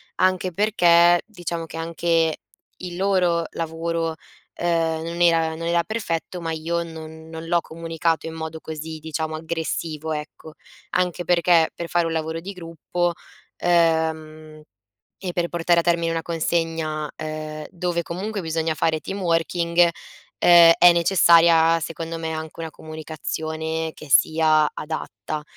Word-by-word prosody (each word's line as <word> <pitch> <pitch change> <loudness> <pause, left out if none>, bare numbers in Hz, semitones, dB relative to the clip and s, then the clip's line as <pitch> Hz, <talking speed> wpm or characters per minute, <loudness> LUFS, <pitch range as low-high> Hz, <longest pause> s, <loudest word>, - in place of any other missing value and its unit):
anche 185 0 +1
perché 175 -3 +4
diciamo 175 -5 -5
che 165 - -9
anche 165 -1 0 0.4
il 180 -1 -7
loro 180 -3 +2
lavoro, 165 0 -3 0.4
ehm, 165 -2 0
non 170 +1 -4
era 165 -2 +3
non 165 - -6
era 170 0 +2
perfetto 180 -4 -3
ma 165 - -3
io 165 +2 -2
non 160 -1 -10
non 160 0 -8
l'ho 170 0 +2
comunicato 165 0 -2
in 160 - -6
modo 160 0 -6
così, 160 0 -7
diciamo, 160 0 -4
aggressivo, 160 -1 -4
ecco. 150 +1 -8 0.4
Anche 180 -1 0
perché, 170 -1 +4
per 170 - -6
fare 170 -1 +2
un - - -3
lavoro 160 0 -3
di 195 - -6
gruppo, 175 0 -3 0.4
ehm, 160 -2 0 0.6
e 185 -2 -4
per 170 -1 -1
portare 170 0 +2
a - - -13
termine 170 -1 +1
una 165 0 -1
consegna, 165 -2 -2
ehm, 155 -1 -6
dove 175 -1 -2
comunque 200 +5 -4
bisogna 160 -1 -1
fare 160 +1 +1
team 195 +1 -5
working, 170 0 +2 0.5
ehm, 170 -1 +8
è 175 0 +8
necessaria 170 -1 +5
secondo 165 +1 -5
me 160 0 -4
anche 160 +1 -7
una 165 - -4
comunicazione 160 +1 -4
che 155 - -12
sia 155 +1 +4
adatta. 155 -1 -5
165 Hz, 140 wpm, -23 LUFS, 160-170 Hz, 0.6 s, ehm